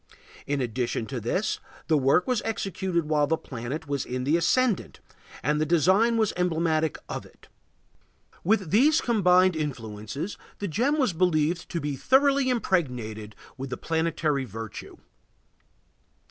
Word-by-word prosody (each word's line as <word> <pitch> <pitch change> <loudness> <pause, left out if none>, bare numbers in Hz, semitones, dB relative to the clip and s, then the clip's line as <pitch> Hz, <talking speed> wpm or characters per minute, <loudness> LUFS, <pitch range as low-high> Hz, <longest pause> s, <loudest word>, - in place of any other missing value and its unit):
In 140 -1 0
addition 120 -1 -2
to 130 +1 -4
this, 180 - -1 0.3
the 160 - +2
work 140 +5 +3
was 250 -4 0
executed 190 -6 -2
while 150 -1 +2
the 160 - +1
planet 135 +5 -6
was 140 -2 -1
in 125 0 -4
the 145 +5 +2
ascendant, 210 +6 +1 0.4
and 150 +1 +1
the - - +4
design 190 +8 +3
was 220 -2 +1
emblematic 160 -3 +1
of - - -5
it. - - -20 0.9
With 195 -3 +1
these 290 - +5
combined 185 -5 +4
influences 125 - -5 0.2
the 205 - -3
gem 245 - +1
was 260 - +2
believed 165 -1 +1
to 170 - -2
be 145 -2 -3
thoroughly 275 - +3
impregnated 125 - -1 0.2
with 135 0 -5
the - - -4
planetary 160 -3 0
virtue. 115 -2 -8
160 Hz, 140 wpm, -26 LUFS, 135-195 Hz, 0.9 s, these